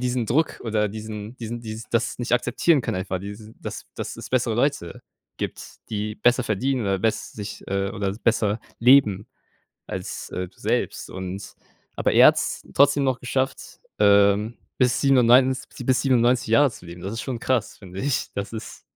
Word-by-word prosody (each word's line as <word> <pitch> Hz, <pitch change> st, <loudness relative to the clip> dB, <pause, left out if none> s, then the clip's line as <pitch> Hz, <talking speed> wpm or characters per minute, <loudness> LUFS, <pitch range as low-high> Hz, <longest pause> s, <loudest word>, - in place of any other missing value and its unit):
diesen 125 Hz, -1 st, 0 dB
Druck 155 Hz, +8 st, +1 dB
oder 110 Hz, -2 st, +1 dB
diesen 110 Hz, +2 st, -7 dB
diesen 120 Hz, 0 st, -6 dB
die 110 Hz, -1 st, -6 dB
das 120 Hz, +1 st, 0 dB
nicht 120 Hz, -1 st, -4 dB
akzeptieren 130 Hz, +5 st, +3 dB
können 120 Hz, -, -3 dB
einfach, 95 Hz, 0 st, -3 dB
die 100 Hz, +1 st, -7 dB, 0.2 s
dass -, -, -7 dB
dass -, -, -5 dB
es -, -, -8 dB
bessere 120 Hz, -3 st, +1 dB
Leute 120 Hz, -, -1 dB, 0.3 s
gibt, -, -, -7 dB
die 105 Hz, 0 st, -3 dB
besser 120 Hz, +4 st, +3 dB
verdienen 125 Hz, +4 st, 0 dB
oder 100 Hz, -3 st, 0 dB
bess 110 Hz, +3 st, -1 dB
sich 105 Hz, -1 st, -7 dB
äh, 100 Hz, 0 st, -1 dB
oder 100 Hz, 0 st, -2 dB
besser 110 Hz, -1 st, +1 dB, 0.2 s
leben 115 Hz, -6 st, +5 dB, 0.6 s
als, -, -, -6 dB
äh, 90 Hz, 0 st, -4 dB
du -, -, -28 dB
selbst, -, -, -2 dB
und 95 Hz, +1 st, -6 dB, 0.4 s
aber -, -, +1 dB
er -, -, +8 dB
hat's -, -, 0 dB
trotzdem 140 Hz, 0 st, +4 dB
noch 130 Hz, -2 st, 0 dB
geschafft, 130 Hz, +1 st, -3 dB, 0.2 s
ähm, 100 Hz, +2 st, +4 dB, 0.2 s
bis 125 Hz, -2 st, +2 dB
97 130 Hz, -1 st, +3 dB
bis 130 Hz, -1 st, +3 dB
97 125 Hz, -2 st, +3 dB
Jahre 135 Hz, +5 st, +5 dB
zu 90 Hz, -, -13 dB
leben. 85 Hz, +1 st, -10 dB
Das 95 Hz, -, -4 dB
ist 115 Hz, -, -4 dB
schon 130 Hz, -3 st, -4 dB
krass, 130 Hz, -1 st, -1 dB
finde 95 Hz, -1 st, -8 dB
ich. 140 Hz, +1 st, -1 dB
Das 100 Hz, +1 st, -4 dB
ist 110 Hz, -1 st, -8 dB
115 Hz, 175 wpm, -24 LUFS, 100-125 Hz, 0.6 s, er